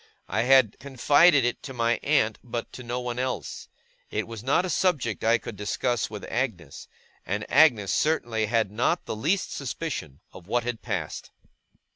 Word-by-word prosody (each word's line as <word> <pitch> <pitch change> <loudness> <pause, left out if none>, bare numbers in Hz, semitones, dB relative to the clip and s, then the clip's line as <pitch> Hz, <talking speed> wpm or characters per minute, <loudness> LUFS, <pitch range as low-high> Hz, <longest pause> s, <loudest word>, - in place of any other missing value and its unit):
I - - 0
had 130 -6 +5
confided 145 +2 +4
it 120 - -1
to 135 -2 -8
my 115 0 +1
aunt, 125 -7 +1
but 120 -1 -5
to - - -8
no 120 0 -3
one 125 0 -4
else. 130 0 -4 0.4
It 105 - -2
was 115 -2 -7
not 140 +9 +2
a - - -3
subject 145 - 0
I 115 +1 +4
could 115 -1 -8
discuss 105 +3 -1
with 105 -1 -8
Agnes, 110 - -4 0.4
and 105 +2 -3
Agnes 120 - +5
certainly 120 -8 +1
had 110 -3 +1
not 125 +11 0
the - - -4
least 165 - 0
suspicion 100 - -5
of 90 -1 -13
what 120 +2 0
had 120 -1 -4
passed. 95 -9 -4
120 Hz, 170 wpm, -26 LUFS, 110-135 Hz, 0.4 s, had